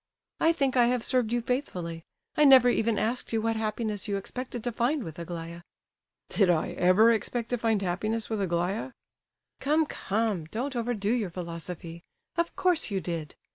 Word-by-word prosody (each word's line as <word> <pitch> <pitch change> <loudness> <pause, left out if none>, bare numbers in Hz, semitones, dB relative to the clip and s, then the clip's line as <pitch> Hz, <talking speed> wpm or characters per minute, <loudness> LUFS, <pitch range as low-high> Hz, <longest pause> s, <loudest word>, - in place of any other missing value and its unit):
"I 325 - +5
think 275 -5 0
I 240 -2 +5
have 245 -1 +1
served 250 -4 +1
you 240 -1 0
faithfully. 180 - -3 0.3
I 300 - +4
never 260 -3 +8
even 225 -2 +1
asked 235 +3 -1
you 225 - +1
what 225 +1 0
happiness 215 -1 -2
you 200 -1 0
expected 245 +3 -5
to 245 - -1
find 245 +5 0
with 165 -3 -8
Aglaya." 170 0 -6 0.7
"Did 195 -4 +2
I 165 -3 +2
ever 190 +6 +5
expect 230 +1 -1
to 245 - 0
find 220 -3 +1
happiness 215 +5 -1
with 220 -2 -2
Aglaya?" 185 +7 -1 0.7
"Come, 310 +3 +2
come, 210 - -1
don't 250 - -4
overdo 230 -3 -1
your 230 -6 0
philosophy. 170 -1 -7 0.3
Of 340 0 -1
course 355 -7 +2
you 195 -2 -1
did. 165 -3 -5
220 Hz, 175 wpm, -28 LUFS, 180-245 Hz, 0.7 s, never